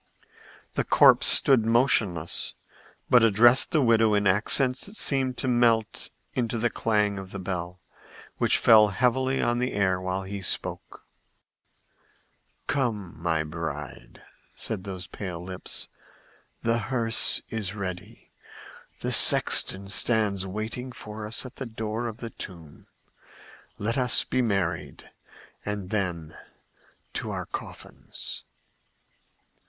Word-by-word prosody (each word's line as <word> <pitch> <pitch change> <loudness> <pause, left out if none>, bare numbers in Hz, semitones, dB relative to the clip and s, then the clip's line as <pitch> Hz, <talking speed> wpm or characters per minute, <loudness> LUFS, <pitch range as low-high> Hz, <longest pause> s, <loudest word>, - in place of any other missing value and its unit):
The - - -1
corpse - - +5
stood 130 -5 +8
motionless, 110 -8 +1 0.5
but 125 -2 +5
addressed 115 +4 +5
the 155 -6 +2
widow 115 -2 +3
in 105 0 +1
accents 125 - +1
that 200 - -12
seemed 130 - 0
to - - -3
melt 120 -3 +1 0.2
into 120 -2 -2
the 115 +1 0
clang 105 -3 0
of 95 -1 -9
the 100 - -7
bell, 90 -1 -5 0.6
which - - +3
fell 110 -1 +6
heavily 130 +5 0
on 120 0 0
the 125 +1 -2
air 95 -2 0
while 95 +1 -3
he 100 +1 -6
spoke. - - -5 1.6
"Come, 110 -10 -2
my 80 -2 0
bride!" 75 -6 -7 0.3
said 100 -3 -4
those 95 -2 -6
pale 90 -1 -7
lips. 90 +1 -5 0.8
"The 115 0 +1
hearse 115 -2 0
is 105 -3 -3
ready; 95 +2 -7 0.7
the - - -2
sexton 100 +1 +4
stands 100 0 +1
waiting 110 +6 -5
for 105 -2 -8
us 115 +4 -3
at 125 - -11
the 130 - -5
door 110 +1 -4
of 115 -1 -7
the 115 -1 -8
tomb. 85 -8 -11 0.9
Let 115 +5 -1
us 125 -2 +3
be 130 - -1
married, 95 -8 -3 0.5
and 105 -2 -5
then 85 -7 -3 0.8
to - - -4
our - - -4
coffins!" - - -8
105 Hz, 125 wpm, -26 LUFS, 95-120 Hz, 1.6 s, stood